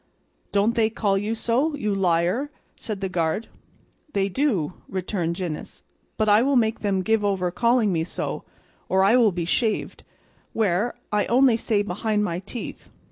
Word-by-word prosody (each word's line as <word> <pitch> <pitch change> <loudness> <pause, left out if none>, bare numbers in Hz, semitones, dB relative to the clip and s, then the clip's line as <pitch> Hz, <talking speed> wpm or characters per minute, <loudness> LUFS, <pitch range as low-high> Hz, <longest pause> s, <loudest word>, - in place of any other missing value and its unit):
"Don't 205 +3 +2
they 225 -2 +2
call 210 -3 0
you 210 +3 -1
so, 255 +7 0
you 210 -8 -1
liar?" 185 +8 +1 0.3
said 210 -3 -6
the 195 - 0
guard. 175 +4 -1 0.6
"They 195 0 +1
do," 195 - 0 0.2
returned 180 -3 -2
Gines, 175 -4 -6 0.3
"but 215 - +1
I 210 +1 +6
will 275 +2 +2
make 225 -2 +2
them 195 -3 0
give 220 +1 +2
over 190 -3 0
calling 235 -1 +2
me 160 -1 +1
so, 165 - -4 0.5
or 190 0 +3
I 205 +5 +5
will 235 -4 +5
be 175 -2 -3
shaved, 215 +5 -1 0.5
where, 210 +2 +1 0.2
I 210 0 +1
only 250 0 +5
say 215 -2 0
behind 210 +2 -1
my 170 -4 -2
teeth. 210 +5 -8
205 Hz, 165 wpm, -24 LUFS, 185-230 Hz, 0.6 s, I